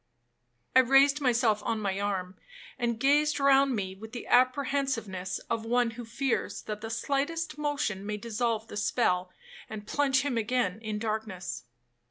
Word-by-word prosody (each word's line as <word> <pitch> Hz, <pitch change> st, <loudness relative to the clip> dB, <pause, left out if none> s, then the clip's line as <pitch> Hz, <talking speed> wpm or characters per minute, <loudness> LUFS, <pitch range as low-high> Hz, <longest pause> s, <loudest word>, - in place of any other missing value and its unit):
I -, -, +9 dB
raised 275 Hz, +3 st, +5 dB
myself 235 Hz, -5 st, +2 dB
on 225 Hz, +1 st, -1 dB
my 195 Hz, -2 st, -2 dB
arm, 190 Hz, -2 st, -2 dB, 0.4 s
and 235 Hz, -2 st, -1 dB
gazed 295 Hz, +4 st, +3 dB
round 275 Hz, -1 st, +4 dB
me 190 Hz, -3 st, -3 dB
with 220 Hz, +4 st, -11 dB
the 240 Hz, -, -6 dB
apprehensiveness 255 Hz, -7 st, +1 dB
of 230 Hz, -1 st, -2 dB
one 240 Hz, +1 st, +1 dB
who 235 Hz, +1 st, -8 dB
fears 225 Hz, -3 st, -2 dB
that 210 Hz, -1 st, -5 dB
the 225 Hz, -, -5 dB
slightest 290 Hz, +7 st, -1 dB
motion 285 Hz, -10 st, -1 dB
may 210 Hz, +1 st, -3 dB
dissolve 225 Hz, 0 st, -2 dB
the 210 Hz, -, -7 dB
spell, 185 Hz, -4 st, +1 dB, 0.4 s
and 215 Hz, -1 st, -7 dB
plunge 270 Hz, +2 st, +2 dB
him 265 Hz, -4 st, -1 dB
again 220 Hz, -4 st, 0 dB
in 215 Hz, -2 st, -3 dB
darkness. 215 Hz, -, -4 dB
230 Hz, 155 wpm, -29 LUFS, 210-270 Hz, 0.4 s, I